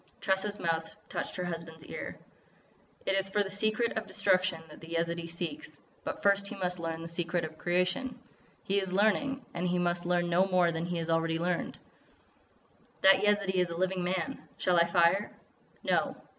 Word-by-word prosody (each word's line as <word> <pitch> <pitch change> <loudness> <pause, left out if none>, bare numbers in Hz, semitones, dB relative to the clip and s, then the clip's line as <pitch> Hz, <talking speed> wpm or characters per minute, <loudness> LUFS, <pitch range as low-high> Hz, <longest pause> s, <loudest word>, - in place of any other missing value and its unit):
Tressa's 200 +2 0
mouth 165 -1 -1
touched - - -4
her 180 - -3
husband's 165 -2 -6
ear: - - -6 0.9
"It - - +2
is 195 0 +1
for 205 +1 +2
the 195 - -6
secret 215 +3 +1
of 220 - -10
Destruction 185 -4 +2
that 150 - -13
the 165 +1 -6
Yezidee 170 0 -1
seeks. 175 - -5 0.3
But - - -5
first 200 0 +4
he - - -5
must 180 -2 -2
learn 165 0 -3
the - - -5
secret 170 0 -1
of 160 0 -10
creation. 180 +9 0 0.5
He 200 +1 +2
is 190 -2 -3
learning.... 225 +7 +2
And 175 +1 -1
he 180 0 +1
must 175 0 0
learn 175 -1 +2
no 175 +3 +3
more 180 -2 +3
than 165 +1 -2
he 175 -1 -2
has 165 0 -2
already 165 0 +2
learned." 175 +1 -1 1.3
"That 190 0 +9
Yezidee 200 -3 +3
is 180 - 0
a 170 - -5
living 185 0 0
man. 180 -1 -2 0.2
Shall 180 -1 +2
I 170 - +6
fire?" 170 +4 +3 0.5
"No." - - +1
180 Hz, 185 wpm, -31 LUFS, 170-195 Hz, 1.3 s, That